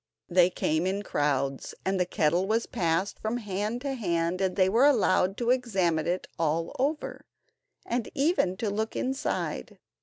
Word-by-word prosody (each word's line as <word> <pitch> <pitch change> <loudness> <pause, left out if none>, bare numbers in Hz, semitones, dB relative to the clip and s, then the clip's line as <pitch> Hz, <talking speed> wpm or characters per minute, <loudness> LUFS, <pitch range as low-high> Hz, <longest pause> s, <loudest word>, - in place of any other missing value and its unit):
They 180 0 +5
came 160 -1 0
in 200 +2 -1
crowds, 140 -5 -1
and 190 0 +1
the 180 - +1
kettle 175 +3 +1
was 225 +2 +1
passed 180 -2 -1
from 220 +2 -2
hand 210 +2 -3
to 280 0 -2
hand, 175 -5 -1
and 190 -1 0
they 185 -1 +4
were 235 +8 +5
allowed 195 -7 +3
to 240 0 +1
examine 190 -11 +1
it 180 +2 -1
all 165 +1 0
over, 295 +4 -2 0.6
and 235 -1 -2
even 275 - +2
to 215 -1 -1
look 220 +2 -2
inside. 265 +1 -2
190 Hz, 160 wpm, -28 LUFS, 170-235 Hz, 0.6 s, They